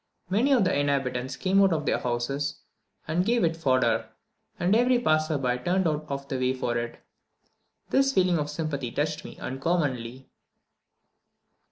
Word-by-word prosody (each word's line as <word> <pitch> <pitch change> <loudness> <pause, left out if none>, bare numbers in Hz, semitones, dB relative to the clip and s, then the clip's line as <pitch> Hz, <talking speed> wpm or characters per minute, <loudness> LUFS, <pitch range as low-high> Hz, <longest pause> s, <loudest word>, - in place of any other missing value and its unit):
Many 235 +9 +2
of 245 -6 +4
the 185 - +1
inhabitants 135 -3 -1
came 195 +1 +2
out 195 -1 +5
of 155 -3 -1
their - - +1
houses 135 +5 -2 0.5
and 165 +3 +1
gave 235 +3 +2
it 165 -1 +2
fodder, 130 -6 +1 0.5
and 180 +4 +3
every 245 +2 +4
passer 155 -7 +1
by 125 -2 0
turned 180 +6 +1
out 155 0 -2
of 140 0 -4
the 135 -2 -3
way 130 0 +1
for 120 -2 -2
it. 120 0 -3 0.9
This 270 0 +3
feeling 180 - +2
of 150 0 -2
sympathy 150 -5 -3
touched 150 +3 -2
me - - -10
uncommonly. 130 -4 -2
150 Hz, 160 wpm, -27 LUFS, 130-180 Hz, 0.9 s, out